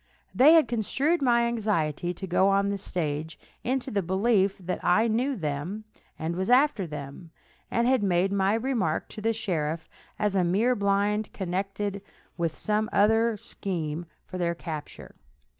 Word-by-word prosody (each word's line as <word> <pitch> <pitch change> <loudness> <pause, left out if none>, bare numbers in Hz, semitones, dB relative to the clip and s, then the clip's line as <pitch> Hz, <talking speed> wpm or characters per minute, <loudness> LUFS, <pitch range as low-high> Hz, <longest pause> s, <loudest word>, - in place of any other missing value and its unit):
They 285 +6 +7
had 320 -6 +6
construed 265 - 0
my 235 -3 +3
anxiety 200 -8 -1
to 180 +2 -6
go 190 +1 +3
on 200 0 +2
the 200 0 -2
stage 160 -4 -3 0.3
into 260 +1 -1
the 200 - +1
belief 195 +2 +2
that 180 -1 -5
I 220 +6 +4
knew 250 +5 0
them, 165 - -4 0.3
and 160 +2 -3
was 190 +3 -2
after 250 - +4
them, 150 +2 -8 0.4
and 235 +1 +1
had 260 -2 +3
made 190 -1 +2
my 200 +1 +2
remark 225 -10 -1
to 215 - -8
the 225 +1 +2
sheriff 165 -7 -2 0.3
as 210 -1 0
a 185 - +3
mere 205 +9 +2
blind 205 +1 +1
connected 195 +2 -3 0.3
with 165 -2 -2
some 215 0 0
other 225 +2 +3
scheme 170 -5 -4 0.2
for 185 - -7
their 170 -1 0
capture. 160 -3 -7
200 Hz, 160 wpm, -27 LUFS, 175-225 Hz, 0.4 s, They